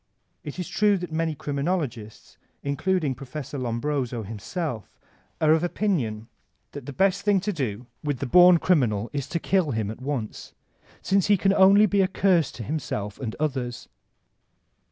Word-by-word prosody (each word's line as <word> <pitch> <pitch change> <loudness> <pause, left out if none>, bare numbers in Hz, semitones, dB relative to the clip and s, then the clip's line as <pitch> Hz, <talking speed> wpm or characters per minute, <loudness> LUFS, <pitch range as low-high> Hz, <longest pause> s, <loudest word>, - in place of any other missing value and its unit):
It 150 - -7
is 180 - -4
true 210 -2 +2
that 175 -2 -6
many 160 0 -1
criminologists, 140 - -4 0.2
including 150 +1 0
Prof. 135 +2 -8
Lombroso 125 -1 -2
himself, 115 - -5 0.4
are 155 -1 +4
of 160 +1 +3
opinion 135 - -1 0.4
that 145 - -9
the - - -4
best 190 +6 +2
thing 205 -2 +3
to 205 +2 -2
do 125 - -3 0.2
with 145 -3 -1
the 140 - -3
bom 180 +5 +7
criminal 120 - +1
is 140 -3 -3
to 170 - -2
kill 185 -2 +1
him 110 -2 -2
at 110 - -10
once, 130 -6 -5 0.5
since 195 0 +2
he 205 -1 +5
can 195 +2 +2
be - - +1
only 200 +1 +5
a 190 - +3
curse 185 -5 +2
to 115 - -7
himself 105 -7 -4
and 115 -5 -4
others. 130 -5 -3
145 Hz, 160 wpm, -25 LUFS, 120-180 Hz, 0.5 s, bom